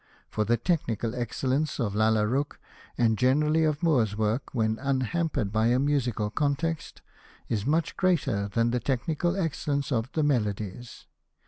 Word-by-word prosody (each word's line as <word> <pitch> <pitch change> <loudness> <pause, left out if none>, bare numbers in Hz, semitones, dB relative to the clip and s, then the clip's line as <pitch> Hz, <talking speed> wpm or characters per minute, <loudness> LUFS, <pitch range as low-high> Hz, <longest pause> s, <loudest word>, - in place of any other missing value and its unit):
For 105 - 0
the 120 +3 +2
technical 120 - -1
excellence 130 +5 -1
of 110 -5 -1
Lalla 110 0 +3
Rookh, 135 +6 -1 0.4
and 110 -3 +2
generally 150 +5 +3
of 155 +1 0
Moore's 120 -11 +2
work 110 +4 0
when 110 -2 0
unhampered 140 -3 -1
by 110 +1 +2
a 120 +1 +3
musical 125 -7 0
context, 150 +4 -2 0.5
is 110 +1 -1
much 160 +3 +1
greater 135 - +1
than 115 +3 +1
the 125 - +1
technical 150 - -1
excellence 150 -5 -1
of 120 +1 -1
the 155 - +1
Melodies. 110 -4 -2
125 Hz, 145 wpm, -27 LUFS, 110-150 Hz, 0.5 s, Lalla